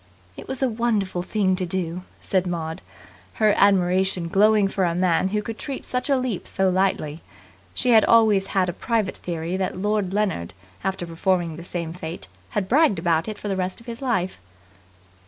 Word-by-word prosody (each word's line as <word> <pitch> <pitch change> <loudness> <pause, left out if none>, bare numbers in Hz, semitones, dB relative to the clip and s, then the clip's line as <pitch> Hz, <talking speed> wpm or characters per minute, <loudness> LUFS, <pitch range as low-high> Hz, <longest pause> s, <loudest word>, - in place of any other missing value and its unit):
"It - - -10
was 265 0 -3
a - - +4
wonderful 215 -6 0
thing 190 0 +1
to 185 - -1
do," 180 -1 -2 0.2
said 185 -1 0
Maud, 160 -2 -4 0.5
her 215 -2 +4
admiration 185 -2 +3
glowing 210 +2 +4
for 195 0 -1
a 170 -1 +1
man 180 0 +2
who 210 +2 -1
could 225 +1 -6
treat 275 -3 -5
such 250 +3 -2
a 275 - +4
leap 255 -7 -3
so 190 -1 +1
lightly. 180 -5 0 0.5
She 250 - +1
had 220 -2 +7
always 215 -4 +4
had 185 -1 +3
a 175 - -2
private 225 -2 -1
theory 170 +1 -3
that 190 -1 -2
Lord 205 -1 0
Leonard, 190 - -1 0.3
after 190 -2 -2
performing 170 0 0
the 165 - -9
same 170 -2 -4
feat, 160 - -7 0.2
had 190 - -2
bragged 265 - +4
about 165 0 +1
it 215 - -5
for - - -6
the 195 - 0
rest 185 0 -2
of 230 - -16
his 235 0 -7
life. 190 -8 -1
190 Hz, 190 wpm, -23 LUFS, 175-215 Hz, 0.5 s, had